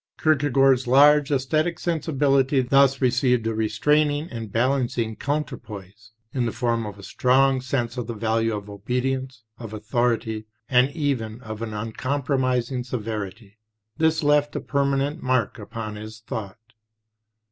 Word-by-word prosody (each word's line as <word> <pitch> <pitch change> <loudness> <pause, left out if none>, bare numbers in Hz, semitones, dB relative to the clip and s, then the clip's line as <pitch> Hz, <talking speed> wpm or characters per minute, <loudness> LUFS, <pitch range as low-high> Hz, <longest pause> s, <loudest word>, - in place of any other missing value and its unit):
Kierkegaard's 135 -4 +3
large 145 +3 +6
esthetic 155 +5 +1
sensibility 140 -5 +1
thus 135 +2 +3
received 125 -2 +2
a 115 - 0
restraining 145 +8 +1
and 115 -4 -6
balancing 120 -2 0
counterpoise 110 -8 -5 0.2
in 125 -3 0
the - - -1
form 115 -1 -1
of 105 -1 -8
a 100 - -12
strong 130 +3 +2
sense 125 -2 -2
of 120 -3 -3
the 115 - -4
value 115 +1 0
of 105 -1 -7
obedience, 125 +4 -3 0.2
of 115 -3 -8
authority, 110 0 -1 0.2
and 125 -1 +4
even 125 -8 -2
of 110 -2 -7
an 110 -2 -4
uncompromising 130 +2 -1
severity. 110 -3 -6 0.4
This 160 0 +2
left 145 0 +2
a - - 0
permanent 140 +2 0
mark 130 -4 0
upon 110 0 -6
his 110 +1 -9
thought. 110 +1 -7
125 Hz, 135 wpm, -24 LUFS, 110-140 Hz, 0.4 s, large